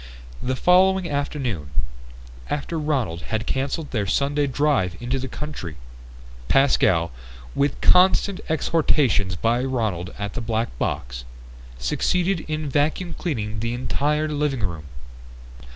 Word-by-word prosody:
The 130 +1 -1
following 185 +4 +4
afternoon 135 - -2 0.8
after 150 +3 -2
Ronald 130 - -1
had 110 +3 -3
cancelled 140 +5 -2
their 105 -5 0
Sunday 140 +6 +1
drive 135 - +1
into 125 +2 -1
the 130 - -4
country 130 - -6 0.7
Pascal, 90 - +3 0.4
with 140 - 0
constant 185 +1 +5
exhortations 145 - +2
by 115 +6 +1
Ronald 110 -9 -1
at 100 -1 -4
the 120 - -3
black 115 - -1
box, - - -2 0.5
succeeded 175 - +1
in 155 -1 -2
vacuum 150 +5 0
cleaning 110 -12 -3
the 115 +2 -1
entire 150 +4 0
living 145 -4 -1
room. 85 -6 -3
135 Hz, 120 wpm, -23 LUFS, 105-150 Hz, 0.8 s, constant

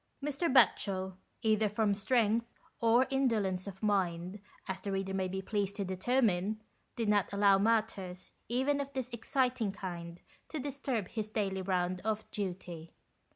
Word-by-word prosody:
Mr. 295 +2 0
Batchel, 190 -7 +3 0.3
either 215 -1 +3
from 210 0 +2
strength 225 +2 +2 0.3
or 235 +3 +5
indolence 215 -9 +1
of 195 +1 -8
mind, 185 -2 0 0.3
as 190 -1 -3
the 200 - -3
reader 195 0 -1
may 190 -1 0
be 190 +1 -4
pleased 200 -1 -1
to 200 -2 -2
determine, 205 0 +1 0.4
did 230 -3 -1
not 205 -2 +3
allow 200 -1 +5
matters 205 -4 0 0.2
even 270 +4 +1
of 280 0 -5
this 260 -2 -3
exciting 250 -2 0
kind, 175 -3 -6 0.3
to 315 - -4
disturb 270 -7 -2
his 215 -1 -3
daily 195 -3 -1
round 180 -1 0
of 220 0 -1
duty. 175 -4 -5
205 Hz, 150 wpm, -33 LUFS, 190-230 Hz, 0.4 s, or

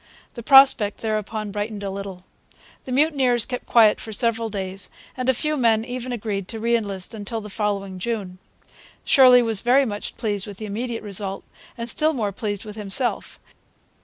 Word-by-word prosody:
The 235 - -8
prospect 265 -5 +5
thereupon 215 -1 -3
brightened 205 0 -4
a 195 - -3
little. 195 -2 -7 0.6
The 260 - -7
mutineers 260 -4 +2
kept 250 -1 -6
quiet 220 -3 +5
for 220 - -8
several 230 +1 -1
days, 195 -2 -3 0.3
and 255 0 -2
a - - +7
few 305 +5 -1
men 230 -4 +2
even 250 0 -5
agreed 205 -5 -4
to 225 +1 -6
re 235 +2 +1
enlist 200 -4 -3
until 220 +1 -5
the 210 -1 -9
following 200 -3 -3
June. 195 -4 -4 0.7
Shirley 250 -3 +6
was 225 -3 +1
very 260 +3 +4
much 205 -3 -5
pleased 205 -3 -3
with 200 -2 -9
the 215 - -6
immediate 230 +3 -4
result, 195 -1 -2 0.3
and 230 0 -5
still 305 +6 +1
more 215 -7 -2
pleased 205 0 -4
with 210 0 -9
himself. 215 +4 +1
220 Hz, 175 wpm, -22 LUFS, 200-240 Hz, 0.7 s, a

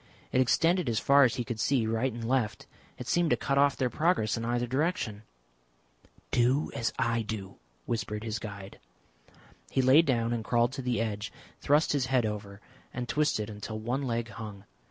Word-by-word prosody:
It 130 - +3
extended 165 +4 +2
as 115 - 0
far 140 +4 +6
as 120 - +1
he 120 - -2
could 120 -2 -5
see 125 0 +2
right 115 +4 0
and 115 0 -5
left. 120 -4 0 0.3
It - - -7
seemed 175 -1 +2
to - - +3
cut 140 0 0
off 140 -1 +4
their 125 -2 0
progress 155 - +1
in 115 - -4
either 120 +1 0
direction. 130 - -1 1.1
"Do 125 +5 +2
as 115 - -1
I 115 0 +1
do," 105 -3 -6 0.3
whispered 110 -2 -3
his 110 -1 -3
guide. 100 -2 -8 0.9
He 130 - +1
lay 130 +5 +7
down 120 -6 0
and 115 -2 -2
crawled 120 +1 +2
to 140 - -4
the 125 -3 -1
edge, 105 -2 -3 0.3
thrust 150 +3 +3
his 135 -3 0
head 130 -3 +2
over 105 -1 -5 0.3
and 125 -1 -4
twisted 145 -7 +1
until 110 +1 -6
one 120 +5 -2
leg 120 -3 -2
hung. 100 -2 -8
120 Hz, 185 wpm, -29 LUFS, 110-135 Hz, 1.1 s, lay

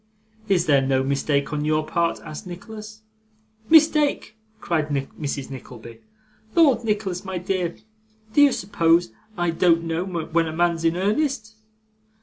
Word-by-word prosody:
'Is 180 -3 +3
there 140 -3 +4
no 130 0 +1
mistake 140 +1 0
on 150 0 -1
your 155 0 +1
part?' 170 +1 0
asked 155 +6 -8
Nicholas. 215 +4 -10 0.7
'Mistake!' 305 -7 +4 0.2
cried 160 -6 -1
Mrs. 140 -1 -4
Nickleby. 120 -3 -10 0.6
'Lord, 275 -9 +4
Nicholas 205 -5 -2
my 190 -2 -4
dear, 180 -1 -2 0.6
do 290 - +5
you 285 -1 +7
suppose 170 - +1 0.3
I 175 -1 +1
don't 165 0 +3
know 165 +1 -2
when 170 -2 -1
a 160 - -5
man's 170 0 +1
in 165 +1 +1
earnest? 220 +3 -1
170 Hz, 135 wpm, -23 LUFS, 155-210 Hz, 0.7 s, you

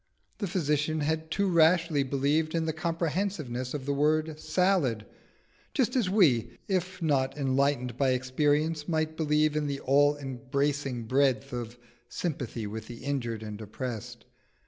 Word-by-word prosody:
The 200 - -1
physician 155 -3 0
had 160 +2 -1
too 200 +4 +1
rashly 165 -3 +4
believed 145 +4 0
in 165 -1 +1
the 160 - -1
comprehensiveness 160 -5 -2
of 135 -3 -5
the 140 - 0
word 155 +2 +1
"salad," 155 - +1 0.7
just 250 -3 +1
as 230 -8 +2
we, 140 - +3
if 185 -1 -2
not 140 -3 +1
enlightened 135 -3 +1
by 135 -1 +2
experience, 150 +4 0
might 160 -1 0
believe 150 -1 +2
in 150 -1 0
the 140 -1 -2
all 145 +2 +4
embracing 135 -1 -2
breadth 130 -1 +1
of 120 -1 -5 0.3
"sympathy 130 -9 -3
with 110 +1 -6
the 120 +1 -9
injured 120 -6 -2
and 105 0 -7
oppressed." 110 +1 -6
145 Hz, 145 wpm, -29 LUFS, 130-160 Hz, 0.7 s, rashly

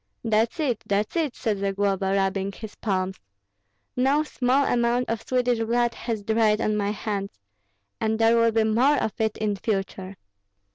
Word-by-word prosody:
"That's 225 +5 +1
it, 260 -8 -1
that's 205 - 0
it!" 315 -6 0
said 215 -5 -1
Zagloba, 195 -1 0
rubbing 195 0 0
his 220 0 -9
palms. 190 -2 -2 0.8
"No 270 +4 +2
small 270 -1 +1
amount 240 0 +1
of 230 -1 -2
Swedish 245 0 0
blood 235 +1 +1
has 225 -3 -4
dried 220 0 +2
on 215 -1 0
my 205 -1 0
hands, 205 -1 -4 0.6
and 220 0 0
there 225 +1 +4
will 230 0 +4
be 225 0 +2
more 240 +7 +3
of 220 - -1
it 220 -1 0
in 210 -1 -1
future. 195 -2 -3
220 Hz, 160 wpm, -25 LUFS, 200-240 Hz, 0.8 s, there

